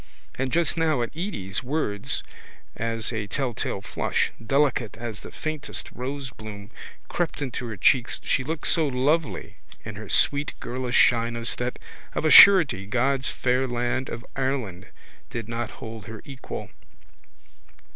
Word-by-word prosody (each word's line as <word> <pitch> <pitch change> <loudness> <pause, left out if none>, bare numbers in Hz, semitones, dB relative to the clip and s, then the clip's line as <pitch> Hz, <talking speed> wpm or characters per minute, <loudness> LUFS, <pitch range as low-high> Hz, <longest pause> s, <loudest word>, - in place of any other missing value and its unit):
And 130 0 -2
just 170 0 +1
now 155 -6 +2
at 120 - -6
Edy's 130 - -3
words 125 -7 -1 0.5
as 115 +1 -1
a 110 -2 -3
telltale 120 -5 -2
flush, - - -1
delicate 135 -2 +1
as 115 -2 -5
the - - -10
faintest 155 -2 -3
rosebloom, 120 -6 -7 0.4
crept 175 -3 -2
into 130 -3 -4
her 110 -3 -6
cheeks 125 +5 +3
she 135 - +1
looked 155 +2 -4
so 160 -2 +3
lovely 145 +4 0 0.3
in - - -7
her - - -8
sweet 145 0 +2
girlish 125 0 -2
shyness 115 -1 +3
that 125 0 -3 0.4
of - - -1
a 155 - +4
surety 165 - +8
God's 130 +4 +1
fair 130 +1 +1
land 120 +1 -1
of 120 +2 -6
Ireland 130 -9 -2 0.4
did 115 -3 -5
not 115 0 -3
hold 110 -2 -9
her 110 -1 -9
equal. 135 -2 -7
125 Hz, 140 wpm, -25 LUFS, 115-140 Hz, 0.5 s, surety